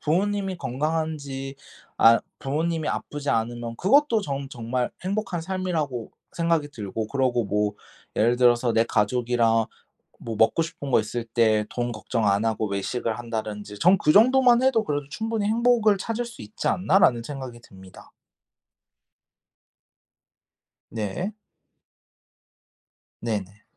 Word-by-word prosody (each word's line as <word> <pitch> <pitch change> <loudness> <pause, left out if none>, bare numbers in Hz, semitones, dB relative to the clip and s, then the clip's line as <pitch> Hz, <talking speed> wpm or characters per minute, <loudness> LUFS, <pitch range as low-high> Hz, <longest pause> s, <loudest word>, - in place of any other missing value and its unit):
부모님이 195 +3 0
건강한지 140 -1 -3 0.4
아 115 0 +7 0.2
부모님이 160 +3 -1
아프지 145 -1 -3
않으면 115 +1 -2
그것도 230 - +3
전 140 -4 -4
정말 125 0 -2
행복한 195 -2 -2
삶이라고 165 -9 -3 0.2
생각이 165 -3 0
들고 110 -2 -5
그러고 130 -3 +1
뭐 105 +1 0 0.4
예를 120 +3 +3
들어서 120 -1 +3
내 115 - +4
가족이랑 115 0 +1 0.5
뭐 115 -2 -5
먹고 110 +9 +3
싶은 160 -4 -7
거 - - +5
있을 115 +2 -4
때 110 -2 +2
돈 120 0 -2
걱정 110 0 -2
안 100 +2 +2
하고 110 -1 0
외식을 110 +4 -2
한다든지 105 -3 -5
전 180 - +5
그 150 - +3
정도만 250 +2 +6
해도 245 -4 +3
그래도 145 -2 -2
'충분히 220 +2 -2
행복을 225 -2 +3
찾을 230 +4 -3
수 235 - -11
있지 105 0 -5
않나.'라는 180 -10 +3
생각이 130 -3 -7
듭니다. 95 -4 -15 2.8
네. 115 - -3 1.9
네네. 105 -3 -4
130 Hz, 270 characters per minute, -25 LUFS, 115-180 Hz, 2.8 s, 아